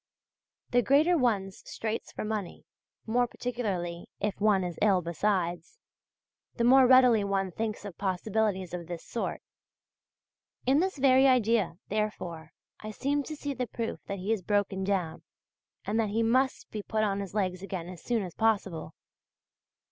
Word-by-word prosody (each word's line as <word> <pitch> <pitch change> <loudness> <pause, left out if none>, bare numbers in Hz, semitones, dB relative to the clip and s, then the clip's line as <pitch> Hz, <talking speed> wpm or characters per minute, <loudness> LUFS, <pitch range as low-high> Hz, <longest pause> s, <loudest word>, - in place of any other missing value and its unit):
The 245 - +4
greater 300 +8 +4
one's 205 - 0
straits 220 0 -4
for - - -5
money 210 -4 -4 0.4
more 245 +2 +2
particularly 195 -10 -3
if 205 0 -2
one 205 -3 +4
is 175 -2 -5
ill 195 -4 +4
besides 175 - -1 0.8
the 235 - 0
more 260 +2 +7
readily 250 -4 +6
one 195 -1 -1
thinks 215 +2 -4
of 195 -4 -8
possibilities 190 -1 -1
of 175 -2 -5
this 175 -1 -6
sort. 235 - -4 1.2
In 265 +3 +4
this 375 -1 0
very 265 0 +5
idea, 230 -8 +2
therefore, 180 -7 -3 0.3
I 215 - -7
seem 280 +6 -1
to 310 +2 -6
see 285 -1 -4
the 255 -2 -3
proof 225 +1 -4
that 200 - -3
he 195 +4 0
is 215 - -2
broken 200 0 0
down, 185 -5 -1 0.6
and 215 +2 0
that 220 -2 +1
he 225 +3 +1
must 260 +4 +1
be 215 - -4
put 215 +1 -1
on 200 -2 0
his 200 0 -6
legs 185 -3 -1
again 185 -3 -5
as 180 -1 -9
soon 235 -4 0
as 180 -3 -7
possible. 195 -8 0
210 Hz, 160 wpm, -29 LUFS, 190-240 Hz, 1.2 s, more